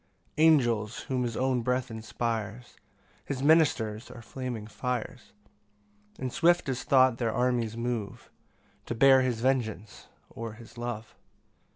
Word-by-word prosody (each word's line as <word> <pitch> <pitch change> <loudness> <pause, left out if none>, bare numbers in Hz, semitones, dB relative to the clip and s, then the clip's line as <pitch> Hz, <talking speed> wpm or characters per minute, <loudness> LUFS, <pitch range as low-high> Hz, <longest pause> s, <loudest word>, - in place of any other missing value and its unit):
3 155 - +4
Angels, 120 -9 +3
whom 130 -1 -2
his 120 -2 -2
own 130 -1 +1
breath 125 +1 -1
inspires, 115 0 -4 0.5
His 135 -1 -4
ministers 135 -8 +3
are 115 - -11
flaming 125 -3 -5
fires; 125 +2 -4 0.9
And 130 -2 -4
swift 175 -1 +3
as 125 -1 -2
thought 130 -3 +4
their 115 -2 0
armies 120 -2 0
move 115 -4 -4 0.6
To 120 - -3
bear 135 +2 +6
his 125 -3 -1
vengeance, 115 -5 -2 0.2
or 115 -1 -7
his 115 +2 -14
love. 120 -2 -5
120 Hz, 135 wpm, -28 LUFS, 115-130 Hz, 0.9 s, bear